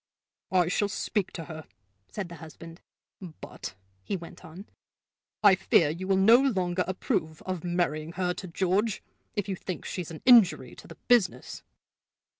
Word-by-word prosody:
"I 180 Hz, -3 st, +3 dB
shall 200 Hz, +3 st, 0 dB
speak 205 Hz, -1 st, -2 dB
to 165 Hz, -, -6 dB
her," 155 Hz, +1 st, -9 dB, 0.4 s
said 205 Hz, -4 st, -5 dB
the 170 Hz, 0 st, -10 dB
husband. 165 Hz, +2 st, -12 dB, 0.4 s
"But," 170 Hz, -, -9 dB, 0.3 s
he 195 Hz, -, -2 dB
went 170 Hz, -1 st, -12 dB
on, 175 Hz, +5 st, -11 dB, 0.8 s
"I 205 Hz, -2 st, +8 dB
fear 175 Hz, -4 st, +3 dB
you 180 Hz, +4 st, -6 dB
will 195 Hz, -1 st, +3 dB
no 220 Hz, +5 st, +7 dB
longer 185 Hz, -9 st, 0 dB
approve 160 Hz, -4 st, -2 dB
of 185 Hz, -3 st, -4 dB
marrying 170 Hz, -2 st, -1 dB
her 180 Hz, 0 st, -1 dB
to 185 Hz, +1 st, -8 dB
George, 195 Hz, +5 st, 0 dB, 0.3 s
if 205 Hz, -2 st, -2 dB
you 195 Hz, -, -2 dB
think 185 Hz, 0 st, -6 dB
she's 180 Hz, -4 st, -5 dB
an 160 Hz, -2 st, -10 dB
injury 205 Hz, -, +5 dB
to -, -, -13 dB
the -, -, -12 dB
business!" 240 Hz, -6 st, +1 dB
180 Hz, 160 wpm, -28 LUFS, 165-195 Hz, 0.8 s, I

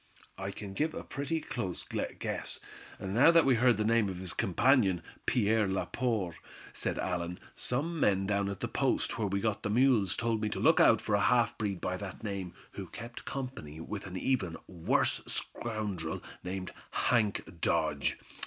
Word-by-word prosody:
"I 95 Hz, 0 st, -3 dB
can 100 Hz, 0 st, -7 dB
give 155 Hz, +9 st, 0 dB
a -, -, -5 dB
pretty 145 Hz, +3 st, -2 dB
close 115 Hz, -, -4 dB, 0.3 s
guess, -, -, -2 dB, 0.4 s
now 105 Hz, +11 st, +4 dB
that 165 Hz, -1 st, +6 dB
we 135 Hz, -, +5 dB
heard 125 Hz, 0 st, +4 dB
the 105 Hz, -, +1 dB
name 115 Hz, -2 st, +3 dB
of 95 Hz, -, -5 dB
his 90 Hz, -1 st, -2 dB
companion, 95 Hz, -3 st, +3 dB, 0.2 s
Pierre 110 Hz, -2 st, +3 dB
Laporte," 95 Hz, -2 st, -1 dB, 0.4 s
said -, -, -2 dB
Allan. 90 Hz, -1 st, -2 dB
"Some 155 Hz, +7 st, -2 dB
men 95 Hz, -6 st, +3 dB
down 100 Hz, 0 st, +1 dB
at 100 Hz, -, -5 dB
the -, -, 0 dB
post -, -, 0 dB
where 105 Hz, -, +1 dB
we 100 Hz, 0 st, 0 dB
got 110 Hz, 0 st, 0 dB
the 105 Hz, -, -2 dB
mules 110 Hz, -5 st, +4 dB
told 115 Hz, -2 st, 0 dB
me 105 Hz, -, 0 dB
to -, -, -3 dB
look -, -, +5 dB
out -, -, +6 dB
for 105 Hz, -, -1 dB
a 100 Hz, -, +4 dB
half 120 Hz, +2 st, +3 dB
breed 100 Hz, -4 st, -2 dB
by 90 Hz, -, -1 dB
that 100 Hz, +3 st, -7 dB
name, 100 Hz, -4 st, -4 dB, 0.2 s
who -, -, -7 dB
kept 120 Hz, 0 st, -8 dB
company 125 Hz, -, -5 dB
with 100 Hz, +4 st, -5 dB
an 95 Hz, 0 st, -5 dB
even 95 Hz, -8 st, 0 dB
worse 85 Hz, -4 st, +1 dB
scoundrel 105 Hz, -8 st, -3 dB, 0.2 s
named 95 Hz, 0 st, -4 dB, 0.2 s
Hank 105 Hz, -7 st, 0 dB
Dodge. 75 Hz, -4 st, +1 dB
105 Hz, 175 wpm, -31 LUFS, 95-120 Hz, 0.4 s, that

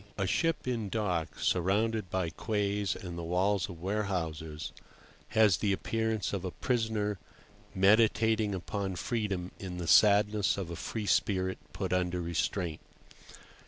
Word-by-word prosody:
A 100 Hz, -, 0 dB
SHIP 165 Hz, -, 0 dB
in 115 Hz, -5 st, -1 dB
dock, 90 Hz, -7 st, -1 dB
surrounded 100 Hz, +3 st, +1 dB
by 90 Hz, -2 st, -1 dB
quays 100 Hz, +1 st, -1 dB
and 85 Hz, -2 st, -7 dB
the -, -, -4 dB
walls 95 Hz, +3 st, +1 dB
of 90 Hz, -3 st, -9 dB
warehouses, 85 Hz, -6 st, -3 dB, 0.6 s
has 110 Hz, -5 st, +4 dB
the 105 Hz, -, 0 dB
appearance 110 Hz, 0 st, -1 dB
of 95 Hz, -2 st, -2 dB
a 95 Hz, -, -2 dB
prisoner 110 Hz, -3 st, -1 dB, 0.6 s
meditating 110 Hz, +1 st, +4 dB
upon 95 Hz, +1 st, -3 dB
freedom 100 Hz, -3 st, -2 dB
in 90 Hz, -2 st, -6 dB
the 90 Hz, -, -4 dB
sadness 105 Hz, +2 st, +5 dB
of 90 Hz, -4 st, -4 dB
a -, -, -4 dB
free 110 Hz, +5 st, -4 dB
spirit 95 Hz, -3 st, +1 dB
put -, -, -3 dB
under 90 Hz, -1 st, 0 dB
restraint. 85 Hz, 0 st, -2 dB
100 Hz, 135 wpm, -31 LUFS, 90-105 Hz, 0.6 s, sadness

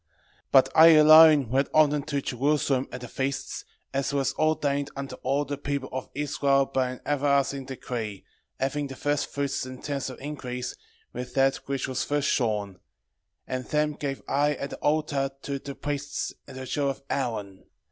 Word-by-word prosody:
1:6 -, -, -49 dB, 0.4 s
But 135 Hz, -1 st, +6 dB
I 160 Hz, +1 st, +9 dB
alone 155 Hz, -3 st, +8 dB
went 135 Hz, +3 st, +1 dB
often 150 Hz, -1 st, +4 dB
to 140 Hz, -1 st, -3 dB
Jerusalem 135 Hz, 0 st, +1 dB
at 125 Hz, -, -7 dB
the 125 Hz, -, -7 dB
feasts, 135 Hz, +3 st, -3 dB, 0.3 s
as 135 Hz, +1 st, 0 dB
it -, -, -3 dB
was 135 Hz, -2 st, +1 dB
ordained 145 Hz, -2 st, 0 dB
unto 140 Hz, 0 st, -5 dB
all 140 Hz, +3 st, 0 dB
the 145 Hz, 0 st, -5 dB
people 140 Hz, -2 st, -3 dB
of 130 Hz, 0 st, -5 dB
Israel 140 Hz, -1 st, +2 dB
by 130 Hz, -1 st, 0 dB
an 125 Hz, -, -8 dB
everlasting 140 Hz, -1 st, +1 dB
decree, 115 Hz, -6 st, -5 dB, 0.4 s
having 140 Hz, +2 st, -1 dB
the 135 Hz, -, -8 dB
firstfruits 140 Hz, 0 st, -1 dB
and 130 Hz, 0 st, -10 dB
tenths 140 Hz, -2 st, -3 dB
of 130 Hz, -, -9 dB
increase, 130 Hz, -3 st, -5 dB, 0.4 s
with 125 Hz, -, -6 dB
that 135 Hz, 0 st, +3 dB
which 135 Hz, -1 st, -2 dB
was 130 Hz, -1 st, -2 dB
first 145 Hz, -1 st, 0 dB
shorn; 105 Hz, -6 st, -1 dB, 0.7 s
and 130 Hz, -1 st, -4 dB
them 150 Hz, 0 st, 0 dB
gave 140 Hz, -2 st, -4 dB
I 145 Hz, +2 st, +2 dB
at 140 Hz, -, -5 dB
the -, -, -6 dB
altar 145 Hz, -2 st, 0 dB
to 140 Hz, -1 st, -3 dB
the 140 Hz, 0 st, -8 dB
priests 145 Hz, 0 st, -3 dB
the 130 Hz, 0 st, -8 dB
children 140 Hz, +1 st, -1 dB
of -, -, -27 dB
Aaron. 105 Hz, -7 st, -3 dB
140 Hz, 175 wpm, -26 LUFS, 130-145 Hz, 0.7 s, I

